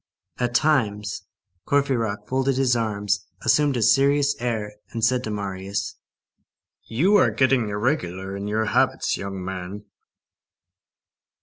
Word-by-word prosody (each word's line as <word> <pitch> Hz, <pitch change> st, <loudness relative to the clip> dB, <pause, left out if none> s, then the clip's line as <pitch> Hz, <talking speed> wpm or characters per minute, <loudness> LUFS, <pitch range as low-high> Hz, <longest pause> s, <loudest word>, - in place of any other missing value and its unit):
At 120 Hz, -1 st, -1 dB
times, 110 Hz, -9 st, +1 dB, 0.4 s
Courfeyrac 115 Hz, -8 st, 0 dB
folded 130 Hz, 0 st, 0 dB
his 130 Hz, -2 st, +3 dB
arms, 105 Hz, -3 st, -1 dB, 0.2 s
assumed 135 Hz, +4 st, +3 dB
a 115 Hz, -, +1 dB
serious 140 Hz, +2 st, +4 dB
air, 110 Hz, -4 st, -2 dB, 0.2 s
and 115 Hz, -1 st, 0 dB
said 125 Hz, +1 st, +1 dB
to -, -, -4 dB
Marius:— 100 Hz, -1 st, -4 dB, 0.9 s
"You 180 Hz, -, +3 dB
are 150 Hz, -, +4 dB
getting 125 Hz, 0 st, +2 dB
irregular 100 Hz, -, -2 dB
in 100 Hz, +1 st, -5 dB
your 110 Hz, +1 st, 0 dB
habits, 105 Hz, -, +1 dB
young 95 Hz, -2 st, -5 dB
man." 95 Hz, +2 st, -6 dB
110 Hz, 120 wpm, -24 LUFS, 100-130 Hz, 0.9 s, serious